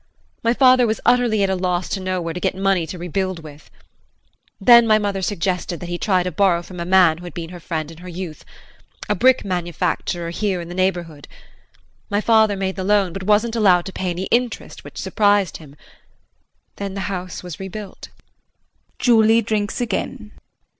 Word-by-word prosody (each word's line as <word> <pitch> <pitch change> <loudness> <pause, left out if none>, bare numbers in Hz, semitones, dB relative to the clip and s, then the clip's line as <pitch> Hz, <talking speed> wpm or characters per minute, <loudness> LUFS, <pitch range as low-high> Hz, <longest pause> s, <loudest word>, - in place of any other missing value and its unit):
My 230 +1 +1
father 255 -2 +5
was 220 - -1
utterly 235 -4 +3
at 195 - +1
a - - +1
loss 180 -1 -1
to - - -2
know 185 -1 -2
where 165 -1 -4
to 180 - -5
get - - -1
money 190 -3 +1
to 180 - -7
rebuild 180 0 -3
with. 150 -1 -13 0.9
Then 235 +3 +7
my 215 -1 +5
mother 200 -2 -2
suggested 180 -2 -2
that 175 - -7
he 175 0 -3
try 185 -4 +2
to 180 - -3
borrow 175 -1 +2
from 180 0 -10
a 170 - -3
man 180 -3 +4
who 180 - -10
had 175 - -9
been 170 -1 -6
her 175 - -9
friend 160 -2 -4
in 165 - -13
her 180 +1 -9
youth 175 -3 -7 0.6
a - - +2
brick 250 +5 +3
manufacturer 175 -1 -2
here 195 0 -1
in 170 0 -7
the - - -6
neighborhood. 175 -5 -2 0.8
My 205 - +1
father 220 -1 +3
made 190 0 -3
the 190 - -3
loan, 195 -3 +2
but 195 - -5
wasn't 215 +4 +2
allowed 185 -6 +4
to 190 - -7
pay 185 - -3
any 175 +1 -3
interest, 240 -1 -1
which - - -12
surprised 205 -5 +1
him. 145 -3 -15 1.0
Then 200 -1 -5
the 195 - -3
house 185 -2 -5
was 180 -3 -8
rebuilt. 195 +1 -8 0.9
[Julie 225 -1 +4
drinks 210 0 -2
again. 225 -1 -3
190 Hz, 190 wpm, -21 LUFS, 175-210 Hz, 1.0 s, Then